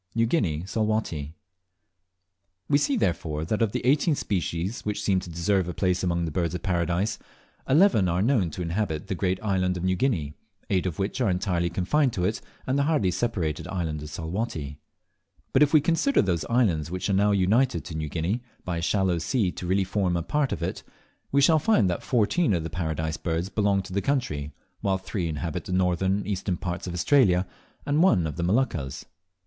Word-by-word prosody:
New 115 Hz, 0 st, +3 dB
Guinea, 90 Hz, -, 0 dB
Salwatty. 100 Hz, -8 st, -2 dB, 1.3 s
We 145 Hz, -, +4 dB
see, 140 Hz, -1 st, +1 dB
therefore, 80 Hz, -6 st, -1 dB
that 105 Hz, +7 st, -1 dB
of 110 Hz, -3 st, +2 dB
the -, -, -3 dB
eighteen 145 Hz, +4 st, +3 dB
species 95 Hz, -1 st, -2 dB
which 105 Hz, 0 st, -3 dB
seem 95 Hz, -2 st, +2 dB
to 90 Hz, -, -9 dB
deserve 85 Hz, +2 st, 0 dB
a 90 Hz, -, -5 dB
place 90 Hz, -1 st, +1 dB
among 85 Hz, -2 st, 0 dB
the 80 Hz, -, -4 dB
Birds 85 Hz, 0 st, -1 dB
of -, -, -5 dB
Paradise, 85 Hz, +2 st, 0 dB, 0.5 s
eleven 135 Hz, -, +5 dB
are 90 Hz, +3 st, +1 dB
known 110 Hz, -8 st, +2 dB
to 90 Hz, +3 st, -5 dB
inhabit 85 Hz, -2 st, -2 dB
the -, -, 0 dB
great 95 Hz, 0 st, -1 dB
island 95 Hz, -3 st, +1 dB
of 85 Hz, -, -5 dB
New 95 Hz, 0 st, +2 dB
Guinea, 90 Hz, -, 0 dB, 0.4 s
eight 95 Hz, -1 st, +2 dB
of 85 Hz, -, -4 dB
which 100 Hz, +6 st, -2 dB
are 115 Hz, -, +3 dB
entirely 90 Hz, -2 st, 0 dB
confined 120 Hz, -, +1 dB
to 90 Hz, -, -1 dB
it 110 Hz, +4 st, -1 dB, 0.2 s
and 130 Hz, +2 st, 0 dB
the -, -, +3 dB
hardly 105 Hz, -, +2 dB
separated 90 Hz, -8 st, -2 dB
island 80 Hz, -5 st, -3 dB
of 75 Hz, -, -7 dB
Salwatty. 80 Hz, -3 st, -4 dB, 0.7 s
But 130 Hz, -, +4 dB
if 145 Hz, -1 st, +5 dB
we 155 Hz, -, +7 dB
consider 170 Hz, -, +2 dB
those 85 Hz, -4 st, 0 dB
islands 95 Hz, -, +1 dB
which 90 Hz, +1 st, -3 dB
are 100 Hz, -, +1 dB
now 100 Hz, +2 st, +3 dB
united 100 Hz, -, +2 dB
to 80 Hz, -, -7 dB
New 80 Hz, -1 st, -3 dB
Guinea 90 Hz, +10 st, -1 dB, 0.2 s
by 85 Hz, -2 st, -2 dB
a -, -, -2 dB
shallow 90 Hz, 0 st, +1 dB
sea 90 Hz, +3 st, 0 dB
to 90 Hz, -, -7 dB
really 95 Hz, +2 st, +2 dB
form 95 Hz, -2 st, 0 dB
a 85 Hz, -, -2 dB
part 145 Hz, -, 0 dB
of -, -, -3 dB
it, -, -, -3 dB, 0.5 s
we 140 Hz, -, +4 dB
shall 155 Hz, +3 st, +5 dB
find 150 Hz, -, +3 dB
that 85 Hz, -, -3 dB
fourteen 125 Hz, -, +2 dB
of 85 Hz, -, -2 dB
the 80 Hz, -, -5 dB
Paradise 80 Hz, -2 st, -2 dB
Birds 85 Hz, +2 st, -2 dB
belong 100 Hz, -2 st, +1 dB
to 95 Hz, 0 st, -9 dB
that 100 Hz, -, +1 dB
country, 90 Hz, -, -1 dB, 0.3 s
while 95 Hz, -1 st, +1 dB
three 95 Hz, -1 st, -3 dB
inhabit 80 Hz, 0 st, -4 dB
the -, -, -6 dB
northern 90 Hz, +1 st, +2 dB
and 100 Hz, -, -5 dB
eastern 95 Hz, -2 st, -2 dB
parts 90 Hz, +1 st, -4 dB
of 90 Hz, -, -4 dB
Australia, 90 Hz, -2 st, +3 dB, 0.4 s
and 145 Hz, +2 st, +2 dB
one 135 Hz, -, +4 dB
the 80 Hz, +2 st, -3 dB
Moluccas. 90 Hz, -, 0 dB
95 Hz, 200 wpm, -26 LUFS, 85-110 Hz, 1.3 s, we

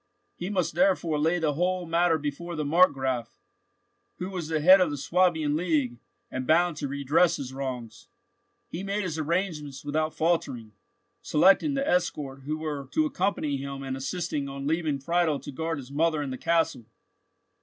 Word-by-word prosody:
He 180 Hz, -, -5 dB
must 180 Hz, -5 st, 0 dB
therefore 175 Hz, -3 st, +2 dB
lay 165 Hz, +4 st, +2 dB
the 160 Hz, -3 st, 0 dB
whole 180 Hz, +3 st, 0 dB
matter 165 Hz, 0 st, +2 dB
before 155 Hz, +4 st, -5 dB
the 155 Hz, -1 st, -2 dB
Markgraf, 135 Hz, -7 st, +2 dB, 0.8 s
who 185 Hz, +1 st, -5 dB
was 175 Hz, -5 st, -4 dB
the 160 Hz, -1 st, 0 dB
head 185 Hz, +5 st, +7 dB
of 180 Hz, -, +3 dB
the 145 Hz, -, -4 dB
Swabian 160 Hz, 0 st, +2 dB
League, 150 Hz, -8 st, 0 dB, 0.3 s
and 130 Hz, 0 st, -4 dB
bound 170 Hz, +1 st, +3 dB
to 145 Hz, -, -3 dB
redress 140 Hz, +5 st, +2 dB
his 130 Hz, -1 st, -6 dB
wrongs. 125 Hz, -5 st, -6 dB, 0.6 s
He 175 Hz, -, -6 dB
made 200 Hz, +1 st, -2 dB
his 165 Hz, -4 st, -3 dB
arrangements 155 Hz, -4 st, -2 dB
without 155 Hz, +2 st, -1 dB
faltering, 145 Hz, -9 st, -1 dB, 0.5 s
selecting 195 Hz, -, +4 dB
the 275 Hz, 0 st, -1 dB
escort 145 Hz, -6 st, -1 dB
who 155 Hz, +2 st, -2 dB
were 150 Hz, -3 st, -4 dB
to 310 Hz, -, +3 dB
accompany 195 Hz, -, -1 dB
him, 135 Hz, 0 st, -6 dB
and 135 Hz, -1 st, -3 dB
insisting 145 Hz, 0 st, -3 dB
on 135 Hz, 0 st, -6 dB
leaving 155 Hz, -1 st, 0 dB
Friedel 160 Hz, +1 st, +1 dB
to 140 Hz, -, -8 dB
guard 160 Hz, +3 st, -3 dB
his 135 Hz, -1 st, -9 dB
mother 155 Hz, +1 st, +1 dB
and 135 Hz, -2 st, -4 dB
the -, -, -5 dB
castle. 165 Hz, -7 st, +1 dB
155 Hz, 170 wpm, -27 LUFS, 140-175 Hz, 0.8 s, head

